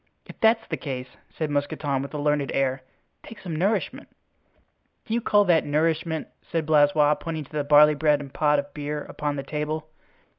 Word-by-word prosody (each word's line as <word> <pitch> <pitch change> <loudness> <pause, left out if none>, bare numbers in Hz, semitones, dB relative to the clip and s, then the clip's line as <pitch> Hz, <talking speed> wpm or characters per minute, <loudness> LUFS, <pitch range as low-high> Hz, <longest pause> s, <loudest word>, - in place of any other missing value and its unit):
"If - - -13
that's 225 0 +3
the - - -3
case," 130 -3 -5 0.2
said 155 -2 -4
Mousqueton, 145 -1 -1
with 140 - -6
a - - -2
learned 145 -1 0
air, 135 -1 0 0.4
"take 225 - -12
some 170 -4 -6
nourishment." 195 +7 -1 1.0
"Do 220 - -4
you 235 - +1
call 205 -2 +3
that 170 -3 +4
nourishment?" 160 +1 -1
said 165 -2 -3
Blaisois, 150 -1 +4
pointing 160 -2 -4
to - - -22
the 150 -1 -1
barley 150 +1 +6
bread 150 0 +2
and 140 -2 -9
pot 150 -1 +2
of 140 0 -4
beer 150 0 -4
upon 145 -1 -4
the 140 - -4
table. 155 +2 -4
150 Hz, 185 wpm, -25 LUFS, 145-160 Hz, 1.0 s, barley